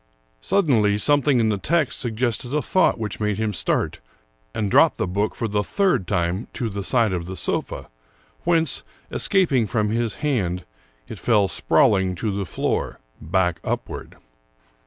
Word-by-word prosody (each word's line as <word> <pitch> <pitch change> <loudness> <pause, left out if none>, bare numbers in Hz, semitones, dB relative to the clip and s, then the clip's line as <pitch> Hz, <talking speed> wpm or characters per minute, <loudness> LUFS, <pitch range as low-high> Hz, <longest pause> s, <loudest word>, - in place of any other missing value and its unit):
Suddenly 125 - +2
something 145 +2 +3
in 110 -1 +2
the 105 -2 -1
text 155 - 0
suggested 120 +2 -1
a 150 - +2
thought 185 -3 +2
which 110 -3 -4
made 105 -2 -1
him 110 -1 -1
start - - 0 0.5
and 105 - -2
drop - - +5
the - - 0
book 100 +4 -1
for 115 - -2
the 105 -1 0
third 190 - +1
time 90 +1 -1
to 115 - -2
the 100 0 -4
side 115 -1 +2
of 85 -1 -3
the 95 - -6
sofa, 70 -4 -3 0.6
whence, 165 -4 +2 0.3
escaping 140 - +2
from 105 0 0
his 115 -2 -1
hand, 90 -11 -1 0.4
it - - -8
fell 105 -4 +3
sprawling 95 +1 +2
to 105 +4 -2
the 100 -1 -3
floor, - - -2 0.2
back 90 +1 0
upward. - - -5
110 Hz, 155 wpm, -22 LUFS, 95-130 Hz, 0.6 s, drop